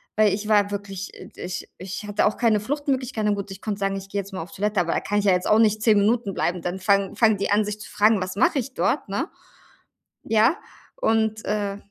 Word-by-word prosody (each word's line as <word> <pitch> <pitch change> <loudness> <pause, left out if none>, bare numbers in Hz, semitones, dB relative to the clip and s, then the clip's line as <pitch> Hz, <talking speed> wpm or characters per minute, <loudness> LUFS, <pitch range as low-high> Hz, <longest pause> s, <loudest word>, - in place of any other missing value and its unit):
weil 215 -2 +4
ich 210 +1 -3
war 205 -2 +4
wirklich 200 -1 -5 0.3
ich 180 0 -6
ich 190 +3 -6
hatte 205 0 +1
auch 210 - -1
keine 220 -3 +3
Fluchtmöglichkeiten 260 -3 -1
na - - +1
gut, 200 0 -5
ich 195 0 -9
konnte 210 -2 -3
sagen: 195 0 0
„Ich 195 0 -6
gehe 200 0 -1
jetzt 195 +1 -13
mal 185 - -4
auf 180 - -13
Toilette“, 205 0 -1
aber 170 -1 +1
da - - +1
kann 205 - -2
ich 205 - -2
ja 195 - +5
jetzt 180 0 0
auch 215 - +5
nicht 215 -1 +3
10 220 -2 +4
Minuten 210 0 +1
bleiben, 175 0 -1
dann 175 +2 -3
fangen 195 0 +2
fangen 220 -3 +4
die 200 - -2
an, 205 +1 +3
sich 210 0 -5
zu - - -9
fragen, 210 -1 +3
was 185 +1 -4
mache 285 - +3
ich 260 +1 -6
dort, 275 - 0
ne? 205 - -2 0.9
Ja, 225 +8 +3 0.4
und, 220 - +1
äh 205 -1 -1
205 Hz, 240 wpm, -24 LUFS, 195-220 Hz, 0.9 s, ja